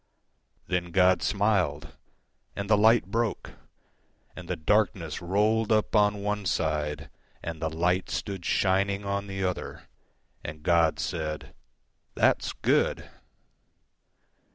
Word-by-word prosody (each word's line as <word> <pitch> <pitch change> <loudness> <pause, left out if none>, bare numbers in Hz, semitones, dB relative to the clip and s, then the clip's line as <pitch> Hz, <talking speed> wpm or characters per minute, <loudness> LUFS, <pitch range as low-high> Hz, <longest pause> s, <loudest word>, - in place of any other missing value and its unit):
Then 90 -1 -2
God 90 0 +4
smiled, 100 -8 0 0.6
And 100 0 -4
the 105 - +5
light 110 0 +4
broke, 115 -1 -2 0.8
And - - -9
the - - -2
darkness 90 -2 0
rolled 105 +5 +1
up 110 +1 +2
on 105 -1 +3
one 105 -1 -2
side, 75 -3 -2 0.3
And 80 -1 -6
the 80 - 0
light 90 +3 0
stood 95 -4 -4
shining 100 +2 +1
on 100 0 -2
the 95 0 -4
other, 90 -1 -4 0.6
And 75 0 -8
God 85 -1 +3
said, 75 -2 -4 0.6
"That's - - +2
good!" - - 0
95 Hz, 115 wpm, -27 LUFS, 80-105 Hz, 0.8 s, the